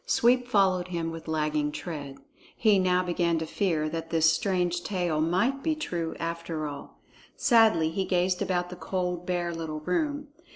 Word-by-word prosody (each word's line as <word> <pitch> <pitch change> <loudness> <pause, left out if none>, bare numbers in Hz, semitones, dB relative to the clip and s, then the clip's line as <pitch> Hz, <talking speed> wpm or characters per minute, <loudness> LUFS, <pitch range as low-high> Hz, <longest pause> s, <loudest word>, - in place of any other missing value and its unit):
Sweep 250 - +3
followed 190 -5 +2
him 170 -2 -3
with 165 0 -9
lagging 150 -1 0
tread. 145 -5 -6 0.4
He 210 -3 +4
now 180 0 +2
began 170 -1 0
to 160 - -2
fear 160 -2 0
that 165 +1 -5
this 160 -1 +4
strange 175 0 0
tale 175 -4 -1
might 190 +12 +1
be 315 +1 0
true 170 - -3
after 165 -1 -3
all. 145 -1 -9 0.4
Sadly 220 - +4
he 190 +3 -1
gazed 180 0 +1
about 180 -2 -1
the - - -6
cold, 180 0 -3
bare 175 -1 -1
little 160 -2 -5
room. 290 - -1
175 Hz, 165 wpm, -27 LUFS, 160-190 Hz, 0.4 s, He